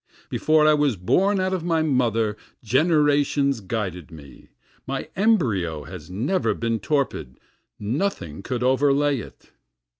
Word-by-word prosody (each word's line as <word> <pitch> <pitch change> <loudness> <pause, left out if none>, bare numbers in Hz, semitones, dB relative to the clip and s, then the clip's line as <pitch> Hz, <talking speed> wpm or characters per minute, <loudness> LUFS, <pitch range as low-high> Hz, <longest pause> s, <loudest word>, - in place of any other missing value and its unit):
Before 155 0 +3
I 155 - +6
was 145 -5 +2
born 190 - +1
out 185 0 0
of 185 -3 -2
my 165 -2 +1
mother 115 -7 +1 0.3
generations 145 0 +2
guided 95 -5 -4
me, 75 -5 -14 0.4
My 135 0 -4
embryo 110 - +1
has 80 +1 -10
never 130 - 0
been 115 -1 -1
torpid, 100 - -2 0.4
nothing 105 - -3
could 125 +3 -3
overlay 140 +1 +2
it. - - -12
130 Hz, 125 wpm, -23 LUFS, 100-155 Hz, 0.4 s, I